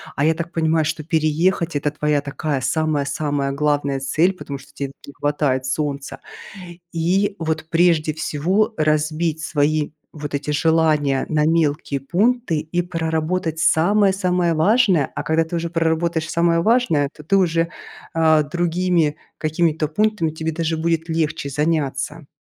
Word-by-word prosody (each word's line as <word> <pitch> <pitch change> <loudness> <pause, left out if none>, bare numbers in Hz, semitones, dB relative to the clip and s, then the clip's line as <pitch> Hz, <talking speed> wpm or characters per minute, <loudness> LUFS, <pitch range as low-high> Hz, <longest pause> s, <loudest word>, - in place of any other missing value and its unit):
А 140 - +1
я 160 - +4
так 170 +1 -5
понимаю, 160 -1 +1
что 155 0 -3
переехать- 160 +2 +1
это 145 +1 0
твоя 150 -1 0
такая 140 -1 -3
самая-самая 145 -1 -1
главная 145 -1 0
цель, 155 +7 +2
потому 145 -6 -7
что 135 - -17
тебе 140 -1 -4
не 140 - -11
хватает 145 -3 0
солнца. 140 0 -3 0.7
И 190 +5 +1
вот, 160 -1 -2
прежде 165 -2 +3
всего, 185 +9 0
разбить 155 +1 0
свои 150 -1 0 0.2
вот 150 -1 -6
эти 140 +1 -2
желания 150 -3 +2
на 150 -1 +2
мелкие 155 -3 +1
пункты 200 - +1
и 160 +3 -2
проработать 165 0 -2
самое-самое 180 +1 +2
важное. 185 - +3
А - - -3
когда 160 +1 +2
ты 160 +2 -4
уже 170 0 -3
проработаешь 165 -1 0
самое 170 0 +2
важное, 210 - +2
то 150 - -12
ты 195 - 0
уже, 165 -2 +1 0.4
э, 160 -1 +4
другими 175 -2 +1 0.2
какими-то 155 0 0
пунктами 205 -1 0
тебе 160 +1 -3
даже 165 0 -1
будет 165 0 -1
легче 160 -3 -1
заняться. 150 0 -1
160 Hz, 140 wpm, -21 LUFS, 150-170 Hz, 0.7 s, я